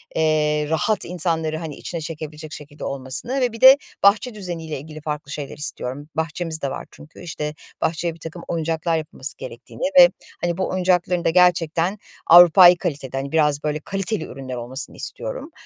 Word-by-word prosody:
eee, 150 -1 +1
rahat 195 +6 0
insanları, 165 -3 -1
hani, 160 -3 -6
içine 170 -2 -6
çekebilecek 155 -1 -7
şekilde 145 0 -10
olmasını 140 - -3
ve 245 -2 +1
bir 230 - -10
de 265 +2 +10 0.3
bahçe 210 +4 +4
düzeniyle 170 -7 -5
ilgili 155 +1 -10
farklı 150 -1 -5
şeyler 145 -1 -6
istiyorum. 145 0 -4
Bahçemiz 160 0 -3
de 140 - -1
var - - -6
çünkü. 155 +3 -15
İşte, 150 -3 -5 0.3
bahçeye 165 +1 -1
birtakım 165 +1 -9
oyuncaklar 165 0 -1
yapılması 145 -4 -5
gerektiğini 120 - -9 0.2
ve 260 - +9 0.3
hani 175 0 -1
bu 190 - -1
oyuncakların 180 -1 +1
da - - +4
gerçekten 175 +1 +2 0.3
Avrupai 175 +1 +9
kalitede 140 -7 -4
hani 140 +1 -4
biraz 150 -2 +2
böyle 150 0 -1
kaliteli 195 +1 -3
ürünler 130 -1 -7
olmasını 125 +3 -5
istiyorum. - - -5
160 Hz, 160 wpm, -22 LUFS, 150-180 Hz, 0.3 s, de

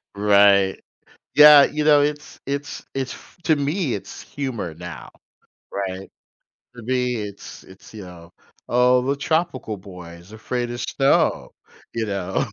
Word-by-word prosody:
Right. 100 -1 +4 0.6
Yeah, 150 -1 +9
you 150 0 -2
know, 150 -1 +5
it's 150 0 -4
it's 140 +1 -5
it's 135 -1 -4 0.3
to 160 - +4
me, 145 0 -1
it's 100 - -8
humor, 120 - -5
now, 85 +1 -9 0.6
right? 95 -1 -5 0.7
To 120 - -11
me 125 +1 -1
it's 105 -2 -8
it's, 95 +3 -17
you 105 -3 -9
know, 85 -2 -13 0.4
"Oh, 125 +1 +3
the 140 +2 0
tropical 155 -6 -2
boy 90 -3 -11
is 90 +5 -18
afraid 120 +2 -4
of 120 0 -5
snow," 135 0 +1 0.4
you 115 -1 -2
know? 95 -3 -2
120 Hz, 140 wpm, -22 LUFS, 100-140 Hz, 0.7 s, Yeah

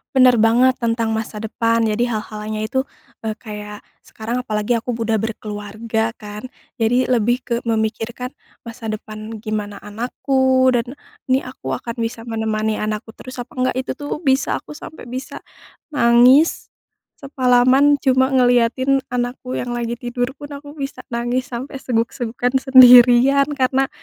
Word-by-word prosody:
Bener 255 -2 +6
banget 240 +4 +4
tentang 230 -1 -1
masa 220 -1 -3
depan 230 +1 0
jadi 225 +1 +1
hal-halnya 215 0 -5
itu, 265 +2 0 0.4
eee, 220 - -1
kayak 210 -2 -9 0.2
sekarang 235 +3 -5
apalagi 215 +2 0
aku 245 +2 -4
udah 225 -1 0
berkeluarga 220 +1 -3
kan, 210 +2 -8 0.3
jadi 245 +2 +1
lebih 240 0 +2
ke 245 -1 -2
memikirkan 225 +2 -2 0.3
masa 230 0 -10
depan, 215 +1 -8
gimana 210 -2 -4
anakku, 260 +4 +1
dan 245 0 0 0.3
ini 260 +1 +2
aku 255 +1 -6
akan 235 0 -5
bisa 230 0 -3
menemani 220 -1 -1
anakku 215 +1 -3
terus 255 -1 -8
apa 245 - -12
enggak, 255 0 +1
itu 260 +1 -4
tuh 290 +1 -5
bisa 270 -3 +1
aku 300 - -11
sampai 310 -7 -11
bisa 255 +2 -6 0.5
nangis, 255 +2 +4 0.5
semalaman 265 +1 +3
cuma 260 -1 +2
ngeliatin 255 +1 +2
anakku 250 +1 -3
yang 245 0 -3
lagi 240 0 -3
tidur 245 0 -3
pun 290 0 -9
aku 290 +1 -10
bisa 275 -2 -5
nangis 240 +2 -2
sampai 265 +3 -6
seguk-segukan 240 +1 -2
sendirian 255 +1 +7
karena 265 0 +1
240 Hz, 140 wpm, -20 LUFS, 225-260 Hz, 0.5 s, sendirian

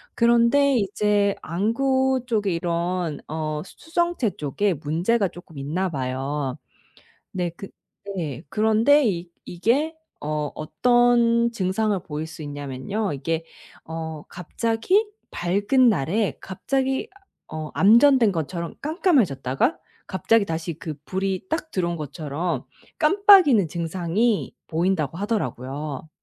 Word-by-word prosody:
그런데 235 +4 +4
이제 205 -1 +1
안구 260 +7 +1
쪽에 210 -6 0
이런 170 -1 -2
어 155 -1 -3
수 - - -15
수정체 340 - 0
쪽에 180 +8 0
문제가 170 +9 0
쪼끔 175 -3 -13
있나 165 +7 -2
봐요. 135 0 -3 0.8
네. 180 -2 -1
그 195 - -8 0.5
네. 150 -8 -4
그런데 220 - +4
이 175 -3 -3 0.2
이게 255 - 0 0.3
어 150 -1 -2
어떤 235 +7 +3
증상을 205 +1 0
보일 155 -3 -5
수 160 0 -10
있냐면요. 145 +8 -4
이게 160 +4 -2 0.4
어 160 -1 -6
갑자기 230 - 0 0.2
밝은 205 +9 +2
날에 185 - 0
갑자기 265 +7 -2 0.4
어 155 -1 -6
암전된 235 +2 +6
것처럼 170 +1 -4
깜깜해졌다가 255 - +1 0.3
갑자기 210 +3 +2
다시 165 0 -3
그 155 -2 -5
불이 190 +1 -2
딱 320 -1 -3
들어온 175 -2 -1
것처럼 155 +2 -3 0.3
깜빡이는 325 - +6
증상이 175 +7 -1
보인다고 165 -2 0
하더라고요. 150 - -3
185 Hz, 245 characters per minute, -24 LUFS, 155-235 Hz, 0.8 s, 암전된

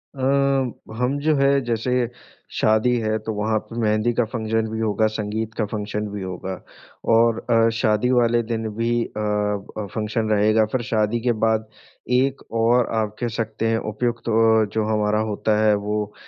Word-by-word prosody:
अ, 130 - -7 0.7
हम 125 +4 0
जो 155 +1 +2
है 140 0 +3 0.2
जैसे 120 +1 0 0.5
शादी 110 +3 +3
है 110 0 0
तो 110 +1 -4
वहाँ 110 +1 0
पे 115 +2 -8
मेहंदी 110 +2 +2
का 120 - +2
फ़ंक्शन 110 -1 -1
भी 110 - -3
होगा, 110 0 +1
संगीत 110 +1 -3
का 110 - -1
फ़ंक्शन 105 0 -4
भी 100 -1 -6
होगा। 95 0 -5 0.5
और 115 0 +4
अ, 115 0 +4
शादी 110 +1 +2
वाले 120 -1 +3
दिन 110 -1 -2
भी 115 +1 0
अ 105 - -7 0.6
अ, 105 - -3
फ़ंक्शन 110 0 -1
रहेगा। 110 +1 +3
फिर 130 - 0
शादी 110 +1 +1
के 120 0 +2
बाद 110 -1 +1 0.5
एक 135 0 -1 0.2
और 120 +1 +3
आप 105 -1 -1
कह 120 - -1
सकते 110 0 -3
हैं 115 0 +2
उपयुक्त 120 +2 -2
ओ 110 -1 +4
जो 110 -1 +1
हमारा 105 -1 +1
होता 105 +1 0
है 105 - +5
वो 105 0 -3
110 Hz, 175 wpm, -22 LUFS, 105-115 Hz, 0.7 s, है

